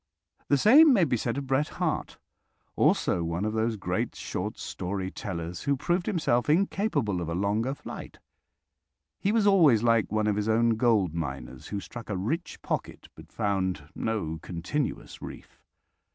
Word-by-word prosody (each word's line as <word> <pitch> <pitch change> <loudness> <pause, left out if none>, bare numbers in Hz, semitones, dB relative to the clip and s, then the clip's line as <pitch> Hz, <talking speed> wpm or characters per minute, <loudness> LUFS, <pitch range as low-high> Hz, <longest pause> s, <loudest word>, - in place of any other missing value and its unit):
The 140 - +4
same 280 - +7
may 200 -7 +4
be 135 -6 +2
said 120 +2 -2
of 140 - -3
Bret 135 +3 +1
Harte, - - -2 0.6
also 85 - +2
one 85 +4 -2
of 110 - -1
those 110 +1 0
great 100 - -2
short - - -4
story 95 0 -4
tellers 85 -4 -5
who 140 -1 +2
proved 175 +6 0
himself 155 - +1
incapable 155 - +1
of 85 - -4
a 85 - -2
longer 105 +8 0
flight. - - -9 1.0
He 200 - +1
was 220 -2 +2
always 160 - +5
like 115 -3 +3
one 110 0 +1
of 105 -1 +1
his 105 +1 -1
own 115 +1 +3
gold 110 -6 +2
miners 65 -5 -5
who 100 - -3
struck 115 +3 -9
a 100 - -1
rich 150 - -3
pocket, - - -4
but - - -15
found 95 -7 -1
no 80 -8 -2
continuous 90 - -4
reef. - - -10
110 Hz, 165 wpm, -28 LUFS, 95-140 Hz, 1.0 s, same